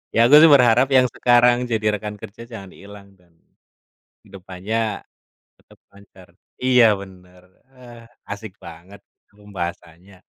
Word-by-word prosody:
Ya, 115 Hz, +1 st, +4 dB
aku 145 Hz, -, +6 dB
sih 165 Hz, -, +6 dB
berharap 125 Hz, 0 st, +3 dB
yang 130 Hz, -1 st, +4 dB
sekarang 120 Hz, 0 st, +3 dB, 0.2 s
jadi 110 Hz, -1 st, -2 dB
rekan 105 Hz, 0 st, -8 dB
kerja 110 Hz, +3 st, -12 dB
jangan 100 Hz, -5 st, -11 dB
hilang, 100 Hz, 0 st, -15 dB
dan, 90 Hz, -1 st, -30 dB, 0.9 s
kehidupannya 95 Hz, +3 st, -7 dB, 0.8 s
tetap -, -, -24 dB
lancar. 100 Hz, -2 st, -19 dB, 0.4 s
Iya, 125 Hz, -2 st, +4 dB, 0.2 s
benar. 90 Hz, -2 st, -16 dB, 0.3 s
Ah, 120 Hz, -2 st, -15 dB, 0.3 s
asik 105 Hz, -1 st, -8 dB
banget 85 Hz, +4 st, -14 dB, 0.3 s
pembahasannya. 95 Hz, -2 st, -10 dB
105 Hz, 125 wpm, -20 LUFS, 95-120 Hz, 0.9 s, aku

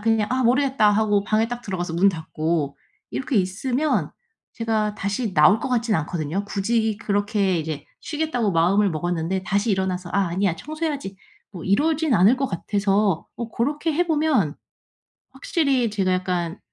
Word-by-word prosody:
그냥 220 Hz, -1 st, +1 dB
아 255 Hz, 0 st, +1 dB
모르겠다.' 255 Hz, -3 st, +3 dB
하고 205 Hz, -1 st, +2 dB
방에 220 Hz, +1 st, +1 dB
딱 245 Hz, 0 st, -5 dB
들어가서 175 Hz, -5 st, -4 dB
문 195 Hz, +4 st, +4 dB
닫고 160 Hz, -3 st, -2 dB, 0.3 s
이렇게 265 Hz, 0 st, -3 dB
있으면 245 Hz, +10 st, 0 dB, 0.4 s
제가 220 Hz, -2 st, -1 dB
다시 200 Hz, +1 st, -3 dB
나올 190 Hz, +8 st, +6 dB
것 265 Hz, -, -4 dB
같진 235 Hz, -3 st, +1 dB
않거든요. 160 Hz, +4 st, -2 dB
굳이 220 Hz, +1 st, 0 dB
그렇게 205 Hz, -3 st, 0 dB
이제 155 Hz, -2 st, -4 dB, 0.2 s
쉬겠다고 295 Hz, -9 st, -1 dB
마음을 190 Hz, +5 st, +3 dB
먹었는데 175 Hz, +3 st, -2 dB
다시 200 Hz, +4 st, 0 dB
일어나서 185 Hz, -2 st, -2 dB
'아 195 Hz, -2 st, +1 dB
아니야. 185 Hz, +1 st, 0 dB
청소해야지.' 295 Hz, -, -4 dB, 0.3 s
뭐 180 Hz, -5 st, -9 dB
이러진 300 Hz, -, +2 dB
않을 210 Hz, +6 st, +5 dB
것 270 Hz, +1 st, 0 dB
같아서 200 Hz, -1 st, 0 dB
어 235 Hz, -1 st, -5 dB
고렇게 295 Hz, +8 st, -1 dB
해보면 305 Hz, -, +1 dB, 0.8 s
확실히 275 Hz, -, 0 dB
제가 195 Hz, -3 st, 0 dB
약간 180 Hz, -2 st, -1 dB
205 Hz, 340 characters per minute, -23 LUFS, 185-245 Hz, 0.8 s, 나올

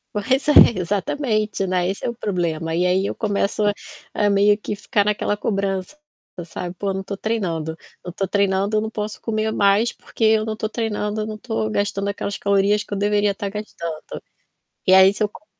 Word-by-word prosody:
Pois 260 Hz, +8 st, 0 dB
é, -, -, +5 dB, 0.3 s
exatamente, 210 Hz, -, -1 dB
né. 180 Hz, -1 st, 0 dB
Esse 195 Hz, -, -4 dB
é -, -, 0 dB
o -, -, -3 dB
problema. 165 Hz, -6 st, -2 dB
E 180 Hz, -, +2 dB
aí 185 Hz, +1 st, +2 dB
eu -, -, -4 dB
começo 205 Hz, -1 st, -1 dB
a 205 Hz, -, +3 dB, 0.4 s
a 210 Hz, -1 st, +2 dB
meio 200 Hz, +1 st, +4 dB
que 210 Hz, -, -4 dB
ficar 205 Hz, 0 st, 0 dB
naquela 210 Hz, 0 st, 0 dB
cobrança, 195 Hz, +4 st, -2 dB, 0.5 s
sabe. 175 Hz, +1 st, -6 dB
Pô, 195 Hz, +1 st, -2 dB
não 190 Hz, -, -3 dB
tô 200 Hz, 0 st, -6 dB
treinando. 170 Hz, -8 st, -2 dB, 0.3 s
Não 175 Hz, -, -5 dB
tô 195 Hz, +1 st, -2 dB
treinando, 200 Hz, +1 st, +1 dB
eu -, -, +2 dB
não 220 Hz, +1 st, -4 dB
posso 210 Hz, 0 st, -4 dB
comer 220 Hz, -1 st, -1 dB
mais. 205 Hz, +3 st, +3 dB
Porque 225 Hz, -, -7 dB
eu 220 Hz, 0 st, +4 dB
não 220 Hz, -1 st, -3 dB
tô 215 Hz, 0 st, -3 dB
treinando, 215 Hz, -2 st, -2 dB
eu 215 Hz, -, -2 dB
não 215 Hz, -, -5 dB
tô 110 Hz, -, -2 dB
gastando 200 Hz, -, -1 dB
aquelas 200 Hz, 0 st, -3 dB
calorias 200 Hz, +1 st, +2 dB
que 205 Hz, -, -8 dB
eu -, -, -2 dB
deveria 205 Hz, 0 st, +2 dB
tá 200 Hz, 0 st, -4 dB
gastando. 170 Hz, -6 st, -6 dB, 0.6 s
E 185 Hz, -, +3 dB
aí 190 Hz, +1 st, +7 dB
se -, -, -2 dB
eu 210 Hz, -, +2 dB
co 300 Hz, +9 st, -16 dB
205 Hz, 205 wpm, -21 LUFS, 190-215 Hz, 0.6 s, aí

